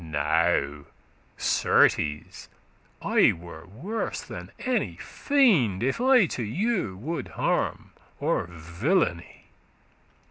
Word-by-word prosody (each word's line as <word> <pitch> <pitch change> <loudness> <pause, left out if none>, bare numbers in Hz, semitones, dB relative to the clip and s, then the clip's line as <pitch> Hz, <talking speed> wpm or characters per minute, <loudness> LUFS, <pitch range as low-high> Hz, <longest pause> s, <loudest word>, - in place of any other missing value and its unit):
Now, 75 -1 0 0.5
certes, 75 -1 +1 0.5
I - - +4
were 85 -1 -11
worse 170 - -4
than - - -9
any 230 - -1
fiend, 170 - +2
If 135 - -1
I 255 -4 +5
to 130 - -4
you 155 - -1
would 140 - -4
harm - - -2 0.3
or - - 0
villainy. 85 - -2
105 Hz, 95 wpm, -26 LUFS, -, 0.5 s, I